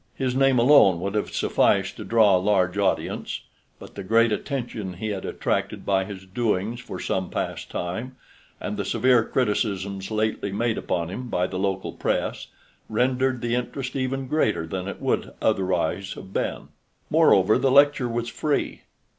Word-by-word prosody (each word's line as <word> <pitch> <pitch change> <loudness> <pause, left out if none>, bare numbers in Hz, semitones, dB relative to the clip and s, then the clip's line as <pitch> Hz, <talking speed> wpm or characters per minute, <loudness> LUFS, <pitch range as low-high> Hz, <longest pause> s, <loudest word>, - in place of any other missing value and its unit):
His 130 -2 -1
name 135 -1 +4
alone 120 -8 +6
would 100 +3 -3
have 105 - -1
sufficed - - +2
to - - -6
draw 110 -4 +4
a - - +3
large 95 -2 +2
audience, 100 -1 -1 0.4
but - - -12
the 100 - -7
great 115 +3 +3
attention 110 -4 -3
he 110 +5 -4
had 100 -2 -4
attracted - - -2
by 95 -1 +1
his 95 -1 -9
doings 110 +2 -1
for 125 - -7
some 95 -1 -2
time - - -18 0.2
past, - - -10 0.8
and - - -4
the - - -1
severe 125 -2 +3
criticisms 100 -5 -1
lately 110 -2 -1
made 115 +3 0
upon 85 -2 -2
him 125 +5 -5
by 90 -4 +1
the 95 0 -4
local 95 -1 -1
press, - - -2 0.4
rendered 125 +2 +1
the 120 -1 -1
interest 125 +1 -3
even 135 0 -2
greater 110 - 0
than 90 +3 -4
it 100 - -6
would - - -1
otherwise 95 -2 0
have 95 0 -11
been. - - -3 0.4
Moreover, 95 +3 +5
the 135 - +2
lecture 140 -2 +4
was 120 0 -2
free. 145 +5 -2
110 Hz, 165 wpm, -24 LUFS, 95-125 Hz, 0.8 s, alone